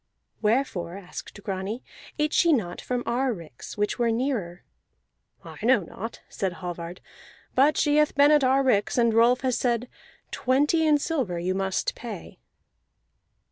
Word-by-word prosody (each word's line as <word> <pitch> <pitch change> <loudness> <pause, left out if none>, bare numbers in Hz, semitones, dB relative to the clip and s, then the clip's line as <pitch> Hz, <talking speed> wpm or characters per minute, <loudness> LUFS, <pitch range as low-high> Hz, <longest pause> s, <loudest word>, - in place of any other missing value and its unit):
"Wherefore," 210 -6 0
asked 200 +1 -9
Grani, 195 +4 -4 0.3
"ate 300 0 0
she 340 - +4
not 180 -10 -1
from 250 -1 -2
our 255 +2 +1
ricks, 165 - -9
which 210 +4 -1
were 235 -1 +2
nearer?" 225 -8 -2 0.8
"I - - -10
know 245 -1 +4
not," 200 +6 -8
said 190 -4 -3
Hallvard, 175 -1 -7 0.5
"but 285 +4 +4
she 295 0 +3
hath 300 0 +3
been 285 +1 +6
at 300 -2 +5
our 265 +1 +3
ricks; 215 -5 +2
and 235 -2 +3
Rolf 235 +2 +4
has 255 -2 0
said: 240 -1 0 0.4
Twenty 290 +5 +2
in 300 -1 +5
silver 270 - -2
must 190 0 -1
you - - -26
pay." 220 -7 -8
235 Hz, 150 wpm, -26 LUFS, 195-270 Hz, 0.8 s, been